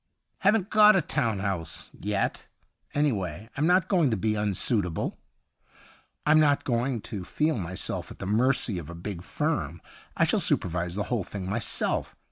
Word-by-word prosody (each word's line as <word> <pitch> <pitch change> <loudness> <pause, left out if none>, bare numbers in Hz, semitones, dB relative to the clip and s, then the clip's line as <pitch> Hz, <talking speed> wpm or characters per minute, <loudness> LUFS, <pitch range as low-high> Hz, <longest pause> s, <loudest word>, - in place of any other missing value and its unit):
' - - -55
Haven't 200 0 +2
got 215 -1 +7
a 190 - +4
town 125 -9 0
house 95 -5 -4
— - - -37
yet. 105 -1 -2 0.5
Anyway 110 - -1
I'm 145 +3 +1
not 180 0 +4
going 175 -8 +3
to 110 - 0
be 110 +3 0
unsuit 105 +1 +2
able; 85 -3 -4 1.1
I'm 155 +1 +6
not 145 -2 +3
going 120 -1 0
to 100 -4 -6
feel 155 - 0
myself 90 0 -4
at - - -11
the - - -6
mercy 110 -1 +2
of 80 -2 -9
a 85 - -7
big 85 +1 -6
firm. - - -2 0.4
I - - +4
shall - - +2
supervise 90 0 0
the 105 - -1
whole 115 -5 0
thing 95 0 -6
myself. 105 +3 -1
110 Hz, 175 wpm, -27 LUFS, 95-150 Hz, 1.1 s, got